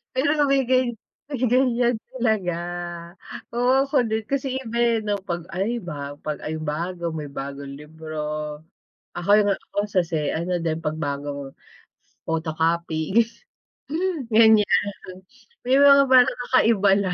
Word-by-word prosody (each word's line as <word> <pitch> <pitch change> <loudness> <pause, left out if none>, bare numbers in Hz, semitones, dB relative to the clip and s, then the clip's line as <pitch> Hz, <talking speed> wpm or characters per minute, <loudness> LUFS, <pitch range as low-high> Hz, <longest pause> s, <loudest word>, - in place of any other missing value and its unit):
Pero 265 +3 +2
'no 295 - +4
may 275 -1 +3
gan 255 -1 +3 0.4
may 275 -5 -4
ganyan 245 -1 +2 0.2
talaga. 220 -8 0 1.0
Oo, 250 +3 +3
ako 275 -2 +1
din 220 0 -1
kasi 270 -1 -1
iba 235 -1 -5
eh 235 -1 +2
'no 210 -1 -1
'pag 170 -2 -4
ay 225 +6 -1
ba 145 -5 -6
'pag 150 -1 -3
ayun 155 0 -4
bago 170 +3 -3
may 150 -2 -5
bagong 140 0 -7
libro. 150 -1 -6 0.6
Ako 175 +2 -5 0.2
nga 200 -1 +2 0.2
ako - - -5
sa 190 -2 +2
si 165 0 -3 0.2
ano 175 +2 -1
din 160 -1 -1
'pag 155 -1 -3
bagong 140 -2 -4 0.7
photocopy 165 +2 -1 1.2
ganyan, 220 -1 +6 1.0
may 260 +2 +4
mga 280 0 +7
parang 255 -1 +7
kakaiba 225 -5 +3
lang 185 -2 -1
185 Hz, 135 wpm, -23 LUFS, 155-240 Hz, 1.2 s, mga